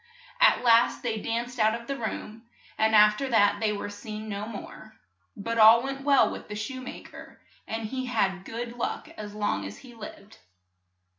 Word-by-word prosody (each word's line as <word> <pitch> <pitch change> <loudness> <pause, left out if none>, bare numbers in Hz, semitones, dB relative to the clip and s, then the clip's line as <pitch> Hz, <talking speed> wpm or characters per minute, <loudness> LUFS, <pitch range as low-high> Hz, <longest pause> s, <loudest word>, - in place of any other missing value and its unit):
At - - +5
last 235 0 +4
they 225 -3 -1
danced 235 +3 -3
out 220 +1 +3
of 235 - -13
the 275 - -3
room, 225 -1 -6 0.3
and 220 0 +2
af 210 0 +6
ter 275 -1 -3
that 205 -3 +3
they 215 0 +1
were 205 0 -4
seen 215 +1 -8
no 205 0 -4
more. 215 0 -10 0.4
But 230 +3 -3
all 225 +2 +8
went 270 0 -4
well 280 -1 +4
with - - -8
the 210 - -6
shoe 255 +5 -5
ma 255 - -8
ker, - - -13 0.3
and 225 0 -4
he 260 +3 -4
had 195 -6 0
good 235 +3 -6
luck 245 +5 -4
as 210 -10 -9
long 205 - -1
as 100 +1 -7
he 245 - -13
lived. 220 -1 -11
225 Hz, 195 wpm, -27 LUFS, 210-240 Hz, 0.4 s, all